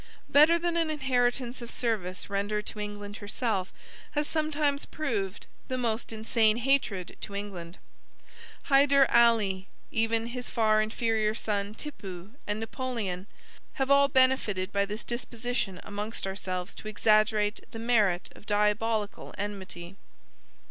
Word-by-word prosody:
Better 310 +4 +7
than 340 0 0
an 330 -1 +1
inheritance 250 -4 0
of 235 - -7
service 200 -8 -2
rendered 205 +1 -1
to 210 - -6
England 205 0 -5
herself, 205 -2 -2 0.4
has 295 0 +1
sometimes 305 -2 0
proved 210 -11 -3 0.2
the 255 - -2
most 230 -2 -1
insane 220 0 +2
hatred 240 -8 +1
to 200 - -6
England. 190 -4 -6 0.9
Hyder 275 0 +5
Ali, 215 -5 +4 0.2
even 225 0 +1
his 250 -1 -5
far 215 -1 +3
inferior 220 0 0
son 205 -1 -2
Tippoo, 195 - -7 0.2
and 210 +1 -1
Napoleon, 225 -6 -3 0.5
have 270 -1 0
all 280 0 +7
benefited 255 -8 +2
by 200 0 +2
this 210 +2 -4
disposition 240 -5 -3
amongst 205 +2 -4
ourselves 185 -1 -4
to - - -9
exaggerate 215 0 +3
the - - -8
merit 215 -6 +2
of 205 - -16
diabolic 210 +1 +2 0.3
enmity. 195 -3 -6
220 Hz, 125 wpm, -29 LUFS, 200-245 Hz, 0.9 s, Better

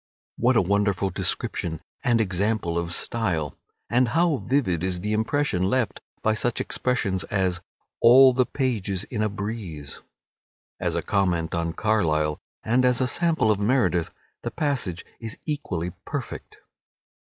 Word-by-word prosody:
What 125 +2 +3
a 110 - +4
wonderful 100 0 +1
description 80 -2 -1 0.2
and 120 -2 +3
example 100 -2 0
of 85 0 -2
style! 85 - -1 0.3
And 125 +1 +3
how 165 +2 +2
vivid 120 - 0
is 90 -1 -1
the 105 +2 -1
impression 110 -3 +1
left 120 +2 0 0.2
by 110 - +3
such 120 +2 +1
expressions 105 -7 0
as 95 -3 0 0.4
"all 130 +2 +8
the 125 0 +2
pages 105 -8 -1
in 105 0 -4
a 110 - +1
breeze." 100 -8 -6 0.8
As - - -1
a - - -1
comment 90 -5 0
on 85 -1 -1
Carlyle, 80 -7 +1 0.2
and 125 +3 +2
as 125 -1 +3
a 130 - +2
sample 160 -3 +2
of 105 - 0
Meredith, 105 -6 +2 0.3
the - - -3
passage 130 - -2
is 115 -1 -5
equally 105 - -3
perfect. - - -6
105 Hz, 145 wpm, -25 LUFS, 90-125 Hz, 0.8 s, all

